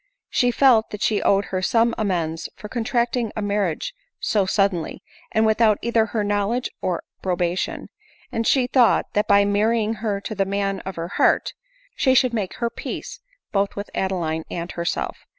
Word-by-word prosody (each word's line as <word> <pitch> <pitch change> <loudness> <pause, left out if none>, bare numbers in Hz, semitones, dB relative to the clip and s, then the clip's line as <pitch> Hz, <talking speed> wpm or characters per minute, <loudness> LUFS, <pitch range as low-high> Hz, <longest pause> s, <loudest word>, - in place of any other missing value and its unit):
She 245 - +3
felt 245 -3 +4
that 210 - -5
she 215 - +2
owed 200 0 +3
her 185 - 0
some 230 +4 +2
amends 170 -6 -2
for 210 - -9
contracting 235 0 -1
a 215 - -2
marriage 205 - -1 0.3
so 200 -3 +1
suddenly, 195 -4 0 0.3
and 220 -1 +3
without 220 -1 +4
either 230 -1 +2
her 220 -2 -1
knowledge 205 +4 0
or 180 -2 -1 0.2
approba 180 -2 0
tion; - - -3 0.4
and 230 0 -1
she 260 -3 +4
thought 245 -2 +3
that 210 - +1
by 200 0 +5
marrying 215 +2 +1
her 210 -3 -1
to 200 - -5
the 200 -2 +1
man 195 0 -1
of 190 - -4
her 165 +1 -4
heart, - - +3 0.4
she 260 - +3
should 255 -1 +4
make 205 -5 -2
her 235 -1 -2
peace - - -6 0.3
both 200 -1 0
with 205 +1 -6
Ade 190 0 -1
line 160 -3 -2
and 170 0 -4
herself. 170 0 -3
205 Hz, 180 wpm, -23 LUFS, 190-230 Hz, 0.4 s, by